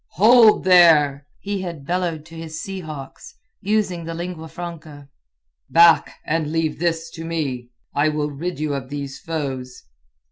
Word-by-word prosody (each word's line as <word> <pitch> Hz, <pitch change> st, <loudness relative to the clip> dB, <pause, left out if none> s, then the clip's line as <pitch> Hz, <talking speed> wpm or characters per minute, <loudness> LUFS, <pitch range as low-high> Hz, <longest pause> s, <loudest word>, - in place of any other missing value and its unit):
"Hold 220 Hz, +2 st, +6 dB
there!" 155 Hz, -6 st, +5 dB
he 200 Hz, -1 st, -3 dB
had 170 Hz, -6 st, -7 dB
bellowed 170 Hz, -2 st, -2 dB
to 165 Hz, 0 st, -13 dB
his 160 Hz, -1 st, -7 dB
sea 195 Hz, +1 st, -5 dB
hawks, 150 Hz, -6 st, -9 dB, 0.3 s
using 195 Hz, -4 st, 0 dB
the 165 Hz, 0 st, -6 dB
lingua 170 Hz, -1 st, -6 dB
franca. 155 Hz, -4 st, -9 dB, 0.6 s
"Back, 170 Hz, -1 st, +5 dB
and 155 Hz, -1 st, -1 dB
leave 160 Hz, -2 st, -1 dB
this 165 Hz, -1 st, -1 dB
to 165 Hz, -, -8 dB
me. 140 Hz, -7 st, -3 dB, 0.2 s
I 145 Hz, +2 st, +2 dB
will 150 Hz, -1 st, -2 dB
rid 155 Hz, +2 st, -5 dB
you 150 Hz, -1 st, -1 dB
of 135 Hz, -2 st, -5 dB
these 140 Hz, -1 st, -6 dB
foes." 135 Hz, -6 st, -5 dB
160 Hz, 150 wpm, -21 LUFS, 145-175 Hz, 0.6 s, Hold